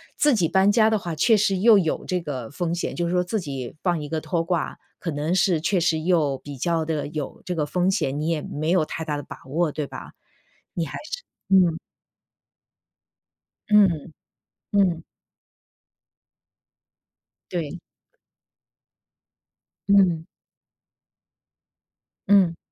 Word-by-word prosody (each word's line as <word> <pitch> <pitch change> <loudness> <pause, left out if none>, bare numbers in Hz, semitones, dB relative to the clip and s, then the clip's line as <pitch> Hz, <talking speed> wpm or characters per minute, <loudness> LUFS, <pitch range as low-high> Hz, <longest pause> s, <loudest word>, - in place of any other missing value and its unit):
自 295 -3 +3
己 180 -6 +2
搬 190 +4 +4
家 220 +1 +4
的 220 -2 +2
话 170 -3 -5
确 225 +9 +4
实 200 -2 +2
又 215 +2 +6
有 160 -4 -1
这 180 - -1
个 130 -7 -5
风 170 +3 -2
险。 175 - -3
就 175 0 -1
是 170 - -2
说 180 0 +2
自 215 +5 -2
己 135 -8 -6
放 175 -3 +1
一 150 - -5
个 160 +1 -3
拖 170 -1 -1
挂， 170 -2 -2 0.2
可 170 - -4
能 150 +4 -1
是 180 -2 +3
确 180 +4 +1
实 165 -2 +1
又 155 -5 +1
比 145 0 -9
较 165 +3 0
地 155 -2 -2
有 150 -3 -5
这 180 - -3
个 150 - 0
风 180 +4 0
险， 145 -7 0
你 155 - -2
也 165 -2 0
没 155 +2 -3
有 175 -3 +3
太 160 +1 -5
大 150 -2 -2
的 145 - -6
把 - - -10
握， 160 +3 0
对 145 -1 -4
吧？ - - -9 0.6
你 170 - -1
还 140 - -6
是 - - -4 0.3
嗯。 180 -4 +4 1.9
嗯， 180 -7 +3 0.6
嗯。 185 -5 +2 2.5
对。 175 -1 -3 2.1
嗯。 180 -5 +4 2.0
嗯。 185 -5 +5
170 Hz, 155 characters per minute, -24 LUFS, 155-190 Hz, 2.5 s, 又